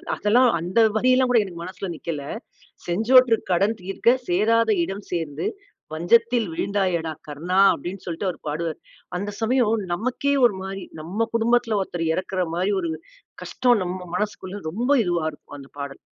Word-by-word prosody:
அதெல்லாம், 240 +4 +4
அந்த 180 +6 -4 0.2
வரியெல்லாம் 255 +2 +3
கூட, 235 - +5
எனக்கு 170 -3 -8
மனசில 185 +1 -6
நிக்கல. 155 -3 -5 0.7
"செஞ்சோற்று 225 +6 +5 0.2
கடன் 200 +5 +2
தீர்க்க. 230 +6 +2
சேராத 220 +5 +3
இடம் 195 +3 -6
சேர்ந்து, 160 -2 -2 0.5
வஞ்சத்தில் 230 +5 +2
வீழ்ந்தாயேடா! 180 -6 -1 0.2
கர்ணா!" 170 +6 -2 0.2
அப்பிடீன்னு 185 +2 -7
சொல்லிட்டு 175 +3 -3
அவரு - - -10
பாடுவாரு. 160 +1 -3 0.4
அந்த 205 +2 -3
சமயம் 225 -3 +1
நமக்கே 255 +7 -1
ஒரு 200 -5 -1
மாரி, 195 0 -6 0.2
நம்ம 210 +8 -2
குடும்பத்தில 230 -1 +2
ஒருத்தரு 170 -3 -3
இறக்கிற 185 0 -2
மாரி 185 +3 +1
ஒரு 165 - -2 0.5
கஷ்டம், 245 -4 +2
நம்ம 180 +1 -4 0.2
மனசுக்குள்ள 205 -1 -4
ரொம்ப 240 - -2
இதுவா 175 -2 0
இருக்கும், 145 - -13
அந்த 135 0 -12
பாடல். 140 -1 -6
195 Hz, 145 wpm, -23 LUFS, 175-230 Hz, 0.7 s, கூட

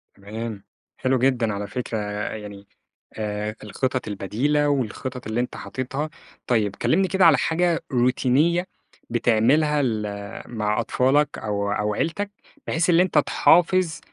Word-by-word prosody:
تمام، 105 +1 -6 0.3
حلو 130 0 +1
جدًا 120 -4 +2
على 100 0 -4
فكرة 125 -3 -4 0.4
يعني 100 -2 -9 0.5
آآ، 105 0 -3
الخطط 130 +4 -2
البديلة 130 +9 0
والخطط 130 -1 -3
اللي 110 +2 -1
أنت 125 - -2
حاططها. 135 +4 -4 0.4
طيب 105 -5 +1
كلمني 190 +11 +2
كده 190 0 +3
على 160 -5 +7
حاجة 170 +4 +1
روتينية 135 +8 +2 0.4
بتعملها 125 +6 +3
ل 115 -5 0 0.5
مع 105 -2 -1
أطفالك 135 +5 +2
أو 100 -2 -2
أو 105 0 0
عيلتك 200 - -2 0.4
بحيث 165 +2 +1
اللي 175 +1 +6
أنت 185 -4 -1
تحافظ 170 +2 +3
125 Hz, 125 wpm, -23 LUFS, 110-150 Hz, 0.5 s, على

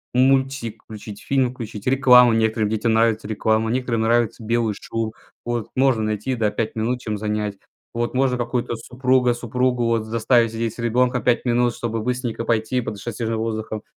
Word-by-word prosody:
Мультик 130 -3 +1
включить, 105 -1 -9
фильм 130 -3 +1
включить, 110 -4 -8
рекламу, 125 -2 +6
некоторым 110 -1 +1
детям 110 +1 0
нравится 110 -1 +2
реклама. 110 +1 0
Некоторым 120 -1 -1
нравится 115 0 +1
белый 115 -1 +1
шум. 115 -1 -3 0.3
Вот. 120 -2 -3
Можно 130 -4 +2
найти, 110 +4 -2
да, 110 -3 0
5 110 -1 -2
минут, 120 +3 -1
чем 110 -3 -3
занять. 105 -1 -2 0.4
Вот. 120 0 -2
Можно 130 -1 +1
какую-то 120 0 -2
супруга, 125 +1 +1
супругу, 125 +1 -1
вот, 115 -1 0
заставить 115 +1 +2
сидеть 115 -1 -2
с - - -16
ребёнком 125 +2 +1
5 120 -2 +2
минут, 120 -1 +1
чтобы 115 -1 -3
быстренько 125 -1 -3
пойти 115 +2 0
подышать 110 -1 -5
свежим 115 -1 -2
воздухом. 110 -1 -3
115 Hz, 165 wpm, -22 LUFS, 110-125 Hz, 0.4 s, рекламу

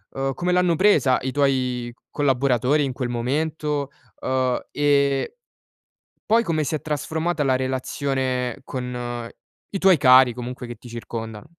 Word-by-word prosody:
ehm, 135 0 -1
come 180 +5 -1
l'hanno 180 -2 +3
presa 150 -9 +4
i 130 0 -2
tuoi 125 -4 0 0.2
collaboratori 135 0 +2
in 135 - -3
quel 125 -1 -3
momento, 145 +3 -2 0.3
uhm, 130 -1 0
e 140 -2 +2 1.0
poi 230 +1 +5
come 160 -6 0
si 150 - -3
è 155 - -2
trasformata 160 +2 -2
la 130 -2 +2
relazione 130 -1 -2
con 125 -2 -5 0.4
i 200 - -3
tuoi 190 -2 +5
cari 130 -2 +6
comunque 125 +1 -6
che 120 - -6
ti 120 - -14
circondano? 115 +2 -7
130 Hz, 140 wpm, -23 LUFS, 125-150 Hz, 1.0 s, cari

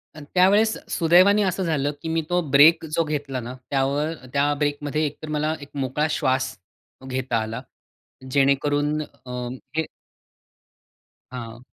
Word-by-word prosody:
आणि 150 - -10
त्यावेळेस 205 +5 +4
सुदैवाने 185 +5 +5
असं 190 0 -1
झालं 145 -4 0
की 160 - -4
मी 165 0 +1
तो 180 0 +2
ब्रेक 160 +4 +6
जो 165 - +3
घेतला 145 -4 -3
ना, 120 +1 -6 0.2
त्यावर 140 +3 0 0.2
त्या 145 +1 +2
ब्रेकमध्ये 145 +1 -1
एकतर 150 +2 -6
मला 155 +1 0
एक 145 - -10
मोकळा 140 +3 0
श्वास 130 -2 0 0.5
घेता 130 -2 -1
आला. 110 +1 -5 0.7
जेणेकरून 145 +2 +2
अ, 130 -3 -12 0.5
हे 160 -1 +1 1.5
हां. 120 -1 -8
145 Hz, 130 wpm, -23 LUFS, 135-160 Hz, 1.5 s, ब्रेक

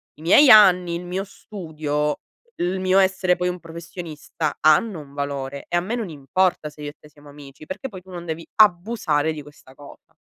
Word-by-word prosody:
i 150 - -17
miei 220 - +6
anni, 180 -5 +6
il 175 +1 -6
mio 185 +2 -3
studio, 155 -7 -4 0.4
il 180 +2 -1
mio 185 +1 +3
essere 190 -1 +2
poi 180 0 -1
un 180 0 -5
professionista, 165 -2 -6
hanno 160 +5 +3
un 140 -2 -13
valore 140 -1 -4
e 175 - +1
a - - +1
me 205 +7 -3
non 225 -6 -4
importa 155 +3 -1
se 150 0 -15
io 145 - -5
e 145 - -13
te - - -17
siamo 145 0 -18
amici 140 0 -13
perché 200 - -6
poi 185 -3 -10
tu 190 +1 -16
non 175 -1 -8
devi 165 0 -5
abusare 175 -6 +2
di 155 - -7
questa 145 -2 -17
cosa". 145 0 -16
170 Hz, 205 wpm, -22 LUFS, 150-185 Hz, 0.4 s, miei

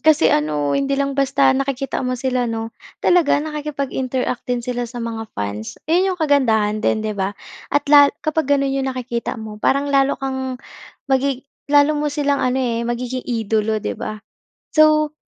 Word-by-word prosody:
kasi 305 - +4
ano, 150 -1 0
hindi 275 - 0
lang 275 0 0
basta 275 0 +3
nakikita 275 0 -2
mo 255 -1 -1
sila 250 -1 -1
'no? 225 0 -4 0.2
Talaga 350 -4 +3
nakikipag-interact 275 -5 -3
din 245 -1 -1
sila 245 -1 -3
sa 240 -1 -6
mga 225 -1 -5
fans? 100 +2 -4
'Yon 355 +5 +2
'yong 360 - -7
kagandahan 220 -8 +2
din 220 0 0
'di 215 - -1
ba, 200 0 -3 0.3
at 290 - +1
la 285 -1 +9 0.2
kapag 310 -2 0
gano'n 275 0 0
'yong 270 0 -1
nakikita 250 -2 -3
mo 215 -1 -8
parang 280 +1 +1
lalo 275 0 +3
kang 265 -1 -3 0.5
magi 270 -1 0 0.2
lalo 290 +1 +5
mo 300 0 -1
silang 285 -1 0
ano, 255 0 +1
eh, 240 -3 0
magiging 250 +1 -3
idolo 220 -2 0
'di 215 - -3
ba? 215 0 -4 0.6
So 305 0 +4
260 Hz, 170 wpm, -20 LUFS, 230-280 Hz, 0.6 s, la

